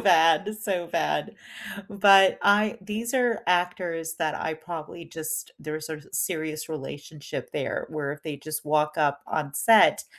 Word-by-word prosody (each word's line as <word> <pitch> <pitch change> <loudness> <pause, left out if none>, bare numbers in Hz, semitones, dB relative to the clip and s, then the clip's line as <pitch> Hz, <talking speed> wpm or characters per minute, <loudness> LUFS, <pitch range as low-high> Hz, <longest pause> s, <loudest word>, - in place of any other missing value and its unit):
bad, 165 +5 +4
so 185 -5 -2
bad, 75 - -1 0.5
but 195 -2 +6
I 210 +1 +4
these 215 +5 -4
are 245 -3 +2
actors 175 -2 0
that 155 -2 0
I 160 0 -3
probably 165 +1 -8
just 155 -1 -5
there's 155 0 -5
a 155 - -5
serious 155 -3 -2
relationship 150 0 -7
there - - -3
where 150 -3 -3
if 150 - -11
they 155 -3 -5
just 155 +2 -6
walk 150 +1 +1
up 145 -2 +1
on 150 -3 -2
set, 225 -1 +5
160 Hz, 145 wpm, -26 LUFS, 155-190 Hz, 0.5 s, but